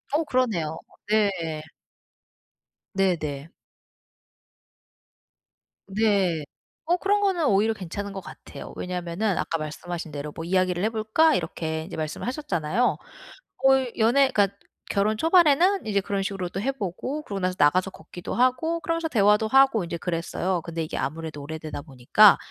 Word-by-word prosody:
어 320 - +2
그러네요. 215 - 0 0.3
네. 185 -8 +1 1.3
네네. 160 -6 -1 2.4
네. 195 -6 +1 0.4
어 350 +2 +2
그런 410 +2 +1
거는 370 -6 +1
오히려 215 +2 +3
괜찮은 200 +1 -6
것 195 - -5
같아요. - - -10
왜냐면은 180 +2 -2
아까 165 - -1
말씀하신 160 +2 -6
대로 145 +1 -5
뭐 165 - -5
"이야기를 185 0 +1
해 220 - +2
볼까?" 225 +9 +3
이렇게 160 -1 -3
이제 - - -8
말씀을 155 +7 -4
하셨잖아요. 235 - 0 0.6
거의 265 -2 +3
연애 255 +5 +4
그러니까 200 -3 +1 0.3
결혼 210 +2 +1
초반에는 340 - +4
이제 200 -2 +1
그런 195 +1 -2
식으로 195 -2 -3
또 195 - -4
해 270 +4 0
보고 265 - -4
그러고 200 -6 -5
나서 185 0 0
나가서 180 +6 +4
걷기도 175 +1 -8
하고 255 +7 +2
그러면서 330 -1 -2
대화도 210 -1 +3
하고 265 -6 +5
인제 170 0 -4
그랬어요. 175 +1 -2
근데 170 -2 -4
이게 155 - -4
아무래도 155 +2 -4
오래되다 155 0 -6
보니까 145 - +5
195 Hz, 335 characters per minute, -25 LUFS, 165-245 Hz, 2.4 s, 하고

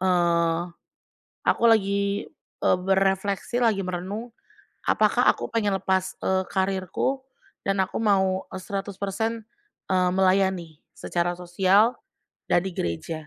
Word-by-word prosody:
eee, 170 -2 +2 0.8
aku - - +1
lagi, 200 -2 +2 0.4
eee, - - +4
berefleksi, 195 +4 0
lagi 215 -5 +2
merenung. 190 +6 -5 0.5
Apakah - - +2
aku - - -6
pengen 215 -3 0
lepas, 190 0 -1
eee, 190 0 +1
karirku 190 +8 -1 0.4
dan 195 0 0
aku 190 - -1
mau 190 -3 +2 0.2
100% 200 +3 -4 0.4
eee, 185 -1 +2
melayani 185 -4 +1
secara 175 0 -2
sosial 190 +6 +3 0.5
dari 185 +2 +1
gereja. 150 - -4
190 Hz, 105 wpm, -25 LUFS, 180-200 Hz, 0.8 s, eee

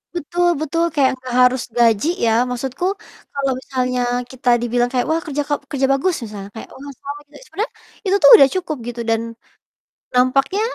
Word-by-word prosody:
Betul 350 +2 0
betul, 330 +2 0
kayak 270 -2 +3
nggak 255 -1 -6
harus 250 0 +4 0.2
gaji 230 +2 +3 0.2
ya, 225 - +3 0.2
maksudku 260 +7 -3 0.5
kalau 275 -1 -1
misalnya 250 -1 -2 0.3
kita 260 -1 -2
dibilang 240 +1 0
kayak, 250 -1 0
"Wah, 325 +1 0
kerja 295 -2 -2
ka 290 - -1 0.2
kerja 270 -1 +1
bagus," 330 +6 +1
misalnya, 205 -2 -8
kayak, 220 - -8
"Wah, 280 +1 -9
selamat 290 +1 -8
ya," - - -14
sebenernya 430 +4 -4 0.3
itu 385 +1 +2
tuh 280 - +9
udah 275 - +7
cukup 345 -4 -2
gitu 240 0 -6
dan 225 0 +1 0.9
nampaknya 270 +10 +2
270 Hz, 175 wpm, -19 LUFS, 245-295 Hz, 0.9 s, tuh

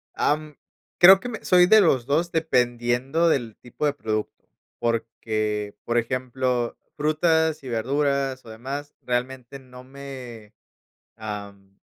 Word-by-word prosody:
Am, 150 0 -1 0.4
creo 190 +2 +9
que 245 - -6
me 220 - -7
soy 180 -1 +5
de 220 +3 +7
los 135 -10 +2
dos 160 +6 0
dependiendo 125 +1 +1
del 120 -8 -1
tipo 125 +5 -5
de 145 - +2
producto, 110 -6 -4 0.3
porque, 110 -3 -2
por 120 0 -1
ejemplo, 125 0 -1 0.2
frutas 160 +1 +1
y 130 - -7
verduras 135 +2 -1
o - - -12
demás, 135 +6 -7
realmente 125 +1 -4
no 125 -1 -14
me, 130 -5 -10 0.6
am, 100 -2 -8
130 Hz, 125 wpm, -24 LUFS, 115-150 Hz, 0.6 s, creo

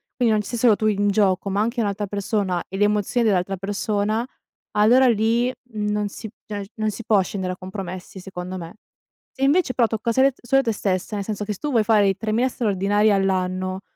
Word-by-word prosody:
quindi 240 -3 +2
non 215 - +2
ci 205 - -9
sei 240 - -3
solo 230 -3 +5
tu 215 - -3
in 205 -1 +1
gioco 195 -1 +2
ma 200 +2 0
anche 235 +2 0
un'altra 205 0 -1
persona 200 -2 -1
e 190 - -6
le 205 - +3
emozioni 210 +3 +1
dell'altra 195 -2 +1
persona 205 +3 -1 0.5
allora 240 +5 +5
lì 230 +2 +2 0.2
non 210 -1 -1
si 220 - -8 0.2
cioè 205 -2 -5
non 215 0 -1
si 230 - -8
può 210 -3 +4
scendere 185 0 -3
a 180 - -10
compromessi 185 0 -7
secondo 185 0 -6
me. 165 +3 -9 0.6
Se 270 - -5
invece 290 -2 +3
però 235 -3 +3
tocca 225 +1 -2
sele 265 +2 +3
solo 270 +3 +3
te 230 - 0
stessa, 190 0 -2
nel 200 - -2
senso 210 -1 -3
che 210 - -2
s 195 - -12
tu 295 - -3
vuoi 225 -3 +3
fare 210 -2 +4
i 195 - -1
3000 225 +4 0
straordinari 205 -2 +1
all'anno, 185 -1 0
210 Hz, 210 wpm, -22 LUFS, 195-225 Hz, 0.6 s, solo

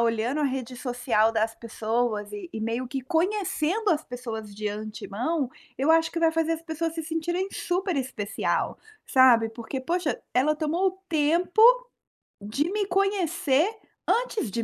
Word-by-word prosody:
olhando 235 +5 +1
a - - +2
rede 255 -1 -5
social 245 -3 +1
das 225 0 0
pessoas 225 -2 -2
e 210 +11 -7
e 220 - -5
meio 230 +3 -2
que 270 +1 -3
conhecendo 370 - 0
as 315 -1 +1
pessoas 225 -4 -6
de 210 +1 -4
antemão, 215 +7 -3 0.3
eu 275 - +1
acho 325 0 +4
que 335 - -2
vai 325 - +4
fazer 325 0 +1
as 325 - -14
pessoas 325 +1 -2
se 325 - -3
sentirem 345 +4 -2
super 360 -1 -1
especial, 250 -6 -1 0.3
sabe. 245 -4 +6
Porque: 235 +4 -5
"Poxa, 335 +3 -1 0.2
ela 300 +4 +3
tomou 315 +3 -1
o 375 +1 -8
tempo 340 +6 +2 0.8
de 275 - -1
me 415 0 0
conhecer 355 -5 +2 0.4
antes 465 - +1
de 230 - -1
290 Hz, 155 wpm, -26 LUFS, 230-335 Hz, 0.8 s, sabe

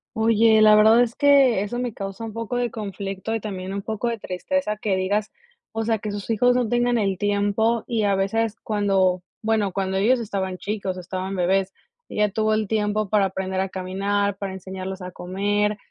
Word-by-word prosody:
Oye, 220 0 +4
la 215 0 +8
verdad 220 +3 +6
es 240 -1 +1
que 275 -7 +5
eso 210 +4 -3
me 245 -3 -2
causa 195 +2 -6
un 220 - -7
poco 230 +2 -3
de 245 -2 -1
conflicto 200 0 -4
y 225 - -1
también, 190 -2 -5
un 200 0 -4
poco 220 +1 -3
de 235 -1 -1
tristeza 210 +5 -2
que 210 -2 -1
digas, 200 +3 -1 0.4
o 225 0 -3
sea, 225 -2 +1
que 210 0 -4
sus 205 -1 -6
hijos 245 +3 +3
no 250 -2 +1
tengan 240 +1 +1
el 195 -4 0
tiempo 205 +3 +1
y 225 -3 -1
a 200 -1 +2
veces 220 +3 0
cuando, 195 -4 +1 0.2
bueno, 215 -3 +1
cuando 190 0 -1
ellos 235 +6 +3
estaban 195 -4 -3
chicos, 195 -2 -3
estaban 185 +2 -4
bebés, 190 +1 +1 0.4
ella 210 -1 +1
tuvo 215 +1 +1
el 215 -1 -1
tiempo 210 0 0
para 210 -2 +3
aprender 190 0 -2
a 195 - -2
caminar, 195 +2 -1
para 195 -1 -4
enseñarles 190 0 -6
a 180 - -6
comer. 205 +4 -1
205 Hz, 195 wpm, -23 LUFS, 190-225 Hz, 0.4 s, la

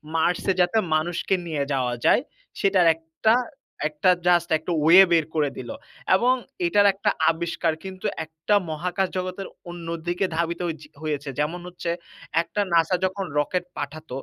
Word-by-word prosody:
Mars-এ 175 +3 +1
যাতে 180 +5 +2 0.2
মানুষকে 175 +4 0
নিয়ে 150 -4 -1
যাওয়া 125 -2 0
যায়, - - +5 0.4
সেটার 190 -3 +4
একটা 165 +7 0 0.9
just 175 -1 +4
একটা 160 +3 -6
way 180 +4 +9
বের 165 -2 +4
করে 150 -2 +2
দিল 120 -2 -7 0.5
এবং 245 +6 +3 0.3
এটার 205 +2 +4
একটা 195 - 0 0.2
আবিষ্কার 165 -1 -1
কিন্তু 190 -1 -8 0.2
একটা 160 +6 -1
মহাকাশ 180 +4 -1
জগতের 185 +1 -4 0.2
অন্যদিকে 175 +2 -3
ধাবিত 170 +1 -1
হ - - -1 0.3
হয়েছে। 145 -2 -3
যেমন 160 +4 -1
হচ্ছে 175 -1 -5 0.5
একটা 170 +5 -5
N-A-S-A 170 +1 +3
যখন 190 +1 -2
রকেট 180 +5 0
পাঠাত, 155 +2 -6
170 Hz, 140 wpm, -24 LUFS, 160-185 Hz, 0.9 s, way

